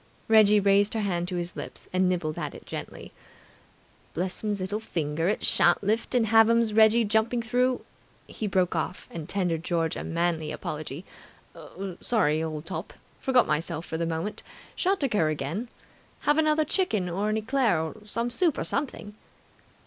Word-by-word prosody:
Reggie 215 Hz, -2 st, +6 dB
raised 200 Hz, +2 st, +3 dB
her 220 Hz, -, 0 dB
hand 175 Hz, -4 st, -1 dB
to 180 Hz, -, -3 dB
his 175 Hz, 0 st, -4 dB
lips, -, -, -8 dB
and 185 Hz, 0 st, +3 dB
nibbled 165 Hz, -4 st, -1 dB
at -, -, -5 dB
it -, -, -12 dB
gently. -, -, -7 dB, 1.0 s
"Blessums 195 Hz, +4 st, -2 dB
'ittle 190 Hz, +3 st, -2 dB
finger! 165 Hz, -5 st, -2 dB
It 210 Hz, -, -1 dB
shall -, -, +5 dB
lift 220 Hz, +5 st, 0 dB
it -, -, +6 dB
and 230 Hz, -, +3 dB
have 225 Hz, +1 st, +6 dB
'ums 230 Hz, -2 st, +3 dB
Reggie 220 Hz, +1 st, +5 dB
jumping 220 Hz, +3 st, +1 dB
through... 250 Hz, +2 st, +1 dB, 0.2 s
." -, -, -32 dB
He 215 Hz, -, -4 dB
broke 185 Hz, -2 st, +1 dB
off 180 Hz, -, -3 dB
and 165 Hz, 0 st, -7 dB
tendered 175 Hz, -5 st, -1 dB
George 165 Hz, -2 st, 0 dB
a -, -, -4 dB
manly 165 Hz, -2 st, -1 dB
apology. 155 Hz, +2 st, -6 dB, 1.0 s
"Sorry, 155 Hz, -10 st, +2 dB
old 155 Hz, -1 st, -4 dB
top! -, -, -5 dB, 0.3 s
Forgot 255 Hz, -2 st, +3 dB
myself 160 Hz, +2 st, -2 dB
for 160 Hz, -, -4 dB
the 170 Hz, -, 0 dB
moment. 165 Hz, +6 st, -3 dB, 0.3 s
Shan't 380 Hz, -3 st, 0 dB
occur 210 Hz, -, +2 dB
again! 155 Hz, -, -3 dB, 0.5 s
Have 295 Hz, +2 st, +3 dB
another 310 Hz, 0 st, +3 dB
chicken 225 Hz, -, 0 dB
or 195 Hz, +5 st, -1 dB
an 215 Hz, -, +1 dB
eclair 225 Hz, -4 st, +1 dB
or 160 Hz, +3 st, -4 dB
some 230 Hz, +3 st, -2 dB
soup 325 Hz, +4 st, +1 dB
or -, -, -1 dB
something!" 250 Hz, -7 st, -3 dB
200 Hz, 170 wpm, -27 LUFS, 170-225 Hz, 1.0 s, Reggie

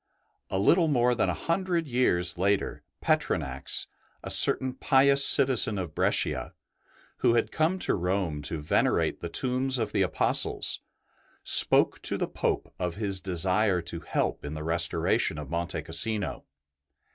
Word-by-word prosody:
A 95 Hz, -, -2 dB
little 165 Hz, -, +3 dB
more 125 Hz, -4 st, +2 dB
than 115 Hz, -, 0 dB
a -, -, -2 dB
hundred 170 Hz, -1 st, -2 dB
years 90 Hz, -9 st, 0 dB
later 100 Hz, +2 st, -1 dB, 0.2 s
Petronax, 65 Hz, +1 st, 0 dB, 0.4 s
a -, -, -5 dB
certain 130 Hz, -1 st, +4 dB
pious 140 Hz, +1 st, +3 dB
citizen 130 Hz, -7 st, +3 dB
of 90 Hz, -5 st, -5 dB
Brescia, -, -, -1 dB, 0.6 s
who 120 Hz, -, +2 dB
had 115 Hz, -, 0 dB
come 165 Hz, +4 st, 0 dB
to -, -, +1 dB
Rome 90 Hz, -4 st, -2 dB
to 75 Hz, +2 st, -5 dB
venerate 75 Hz, -, 0 dB
the 85 Hz, -, -6 dB
tombs 130 Hz, +5 st, 0 dB
of 110 Hz, -3 st, -3 dB
the 100 Hz, -, 0 dB
Apostles, 95 Hz, -, 0 dB, 0.6 s
spoke -, -, +5 dB
to -, -, 0 dB
the -, -, -2 dB
Pope -, -, -3 dB
of 90 Hz, -2 st, -3 dB
his 100 Hz, -3 st, -2 dB
desire 95 Hz, +2 st, +1 dB
to 85 Hz, 0 st, -5 dB
help -, -, -3 dB
in 75 Hz, +2 st, -6 dB
the 75 Hz, -, -6 dB
restoration 85 Hz, +3 st, 0 dB
of 75 Hz, -2 st, -8 dB
Monte 85 Hz, -1 st, -3 dB
Cassino. 105 Hz, +6 st, -2 dB
100 Hz, 145 wpm, -27 LUFS, 85-130 Hz, 0.6 s, spoke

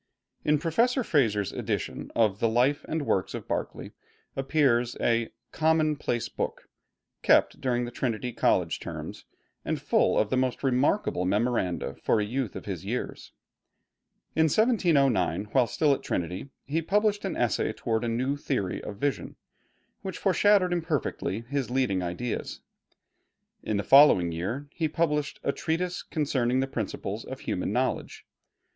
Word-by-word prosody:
In 150 Hz, 0 st, +3 dB
Professor 235 Hz, -, +1 dB
Fraser's 110 Hz, -, +1 dB
edition -, -, -3 dB
of 105 Hz, -4 st, +2 dB
the 115 Hz, -, +2 dB
'Life 125 Hz, +6 st, +2 dB
and 155 Hz, -2 st, -1 dB
Works 95 Hz, -7 st, 0 dB
of -, -, -7 dB
Berkeley' -, -, -4 dB, 0.4 s
appears 135 Hz, -4 st, +1 dB
a 115 Hz, -1 st, +1 dB, 0.2 s
'Common 155 Hz, -1 st, +2 dB
Place 120 Hz, -4 st, -2 dB
Book,' -, -, -5 dB, 0.5 s
kept -, -, +3 dB
during 125 Hz, -2 st, 0 dB
the 120 Hz, -, -6 dB
Trinity 120 Hz, 0 st, -2 dB
College -, -, +1 dB
terms, -, -, -7 dB, 0.4 s
and -, -, -2 dB
full -, -, +2 dB
of 105 Hz, -, +1 dB
most 130 Hz, 0 st, 0 dB
remarkable 130 Hz, -, +1 dB
memoranda 100 Hz, -1 st, 0 dB
for 110 Hz, -, +2 dB
a 105 Hz, -, 0 dB
youth 120 Hz, 0 st, -3 dB
of -, -, -7 dB
his 95 Hz, -4 st, -5 dB
years. 115 Hz, +6 st, -4 dB, 1.0 s
In 160 Hz, -, +4 dB
1709, 160 Hz, -, +2 dB
while 130 Hz, -3 st, +3 dB
still 150 Hz, +3 st, +2 dB
at -, -, -3 dB
Trinity, 90 Hz, -, -3 dB, 0.2 s
he 155 Hz, +4 st, -1 dB
published 205 Hz, +4 st, +1 dB
an 195 Hz, -, -3 dB
'Essay 120 Hz, -2 st, +1 dB
toward 110 Hz, +1 st, -2 dB
a -, -, -1 dB
New 125 Hz, +5 st, 0 dB
Theory 115 Hz, -10 st, -2 dB
of 105 Hz, -, -6 dB
Vision,' 145 Hz, +4 st, -2 dB, 0.7 s
which 190 Hz, -2 st, -5 dB
foreshadowed 195 Hz, -1 st, +3 dB
imperfectly 155 Hz, -, -2 dB
his 130 Hz, +2 st, -3 dB
leading 125 Hz, -7 st, +1 dB
ideas. 90 Hz, +7 st, -4 dB, 1.0 s
In 110 Hz, -, -1 dB
the 100 Hz, -, -1 dB
following 135 Hz, -, +6 dB
year 105 Hz, -, -4 dB
he 165 Hz, -2 st, 0 dB
published 150 Hz, -2 st, -1 dB
a -, -, +1 dB
'Treatise 175 Hz, +4 st, -2 dB
concerning 130 Hz, -5 st, 0 dB
the 135 Hz, -, +2 dB
Principles 115 Hz, -6 st, -4 dB
of -, -, -8 dB
Human -, -, -2 dB
Knowledge.' -, -, -2 dB
130 Hz, 145 wpm, -27 LUFS, 115-155 Hz, 1.0 s, following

